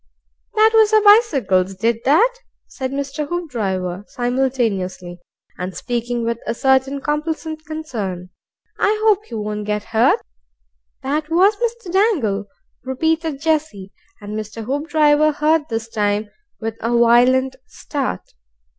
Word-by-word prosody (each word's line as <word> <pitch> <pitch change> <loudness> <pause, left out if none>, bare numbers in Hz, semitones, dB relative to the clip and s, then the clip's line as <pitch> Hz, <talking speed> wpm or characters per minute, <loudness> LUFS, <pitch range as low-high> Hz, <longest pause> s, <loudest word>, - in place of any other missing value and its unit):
"That 435 +1 +5
was 440 -1 +5
our 430 -1 +5
bicycles 275 - +4
did 225 +3 0
that," 395 - +4 0.3
said 260 -1 -5
Mr. 280 +2 -3
Hoopdriver 200 - -3
simultaneously, 230 -9 -2 0.4
and 180 -1 -5
speaking 240 +1 -2
with 230 0 -2
a - - -1
certain 265 +2 +2
complacent 310 +2 -3
concern. 210 - -5 0.5
"I 425 +1 +2
hope 425 -1 +3
he 230 - -8
won't 210 -1 -4
get 210 0 -1
hurt." 225 +1 +4 0.8
"That 300 +3 -2
was 375 +6 +4
Mr. 470 -5 -3
Dangle," 275 - +1 0.4
repeated 315 +3 -1
Jessie, 300 -12 -1 0.3
and 205 0 -7
Mr. 215 +1 -6
Hoopdriver 300 +2 +2
heard 305 +1 +1
this 225 -1 -3
time, 210 -1 -1 0.3
with 225 0 -4
a 235 +1 +1
violent 255 +3 +4
start. 275 -3 -4
260 Hz, 125 wpm, -20 LUFS, 215-315 Hz, 0.8 s, That